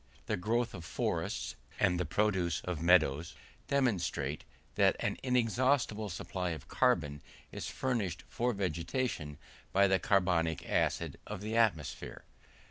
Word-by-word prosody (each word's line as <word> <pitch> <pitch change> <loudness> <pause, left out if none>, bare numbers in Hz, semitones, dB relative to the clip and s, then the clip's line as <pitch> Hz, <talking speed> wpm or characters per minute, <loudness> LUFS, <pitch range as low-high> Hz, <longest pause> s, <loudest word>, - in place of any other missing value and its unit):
The - - 0
growth 115 +6 0
of 85 - -7
forests, - - -2 0.2
and 90 0 +3
the 90 - -1
produce 95 -2 +1
of 90 -4 -4
meadows, 80 -3 +3 0.3
demonstrate 90 - 0 0.3
that - - +4
an - - -1
inexhaustible 125 -3 +1
quantity 90 0 -3
of 75 - -11
carbon 75 -1 +1 0.3
is - - -5
furnished 105 -10 -2
for 125 +1 0
vegetation 85 - -2 0.3
by 100 +1 +5
the 95 -1 +3
carbonic 90 -5 +1
acid - - 0
of 105 -2 -5
the 110 +2 -3
atmosphere. 100 -10 0
95 Hz, 130 wpm, -32 LUFS, 85-115 Hz, 0.3 s, by